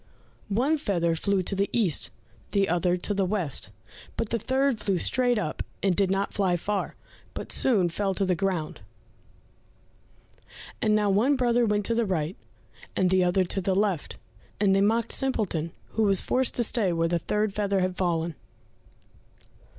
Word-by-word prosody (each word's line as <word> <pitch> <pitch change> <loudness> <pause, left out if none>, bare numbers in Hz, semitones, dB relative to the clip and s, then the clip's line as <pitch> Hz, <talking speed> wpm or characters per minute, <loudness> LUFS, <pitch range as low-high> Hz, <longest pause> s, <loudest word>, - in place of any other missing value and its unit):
One 265 +10 +1
feather 170 - 0
flew 195 +3 0
to 195 - -2
the 200 +1 0
east, 200 -11 +1 0.4
the 200 -1 +2
other 175 +1 +1
to 195 +3 -2
the 195 -1 +1
west, 180 - -1 0.5
but 230 - -2
the 230 - -1
third 260 +1 +1
flew 195 -3 0
straight 245 +5 +2
up 170 -7 -3 0.2
and 190 -3 +2
did 195 0 +2
not 195 +1 -1
fly 185 -3 +1
far, 200 +3 -3 0.4
but - - -6
soon 210 -9 +3
fell 195 +3 -2
to 195 - +1
the 185 - +2
ground. 175 -3 -2 2.0
And 215 -1 +3
now 210 -1 +2
one 235 +9 +3
brother 240 -2 +2
went 210 -1 0
to 230 - +1
the 230 -1 0
right, 170 -1 -1 0.6
and 185 -1 +2
the 185 -1 +4
other 180 +1 +2
to 190 +2 -2
the 190 0 0
left, 195 -6 -1 0.4
and 200 -2 +3
they 195 - +3
mocked 225 +3 +1
Simpleton, 200 - 0 0.2
who 220 - -2
was 200 -3 +3
forced 260 0 +1
to 240 - +2
stay 215 -5 +1
where 165 0 +1
the 170 0 0
third 210 +4 -1
feather 200 -2 0
had 185 0 -1
fallen. 170 -2 -1
195 Hz, 175 wpm, -26 LUFS, 180-215 Hz, 2.0 s, the